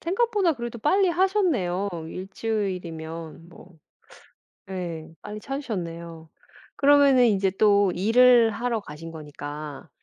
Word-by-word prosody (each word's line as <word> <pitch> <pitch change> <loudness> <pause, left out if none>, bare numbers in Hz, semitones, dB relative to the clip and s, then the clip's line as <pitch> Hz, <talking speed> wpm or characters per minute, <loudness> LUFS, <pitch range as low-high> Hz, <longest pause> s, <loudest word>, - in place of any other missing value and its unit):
생각보다 395 0 +1
그래도 235 -2 -6
빨리 375 - +3
하셨네요 335 - +1 0.2
1 185 +3 -7
주일이면 170 -7 -5
뭐 165 -1 -17 0.9
네 170 -4 -6
빨리 210 0 -8
찾으셨네요. 170 - -6 0.5
그러면은 280 -3 +5
이제 200 -4 +2
또 205 -2 +4
일을 235 +4 +5
하러 235 +1 -2
가신 165 -3 -10
거니까 150 -1 -8
200 Hz, 250 characters per minute, -25 LUFS, 165-250 Hz, 0.9 s, 그러면은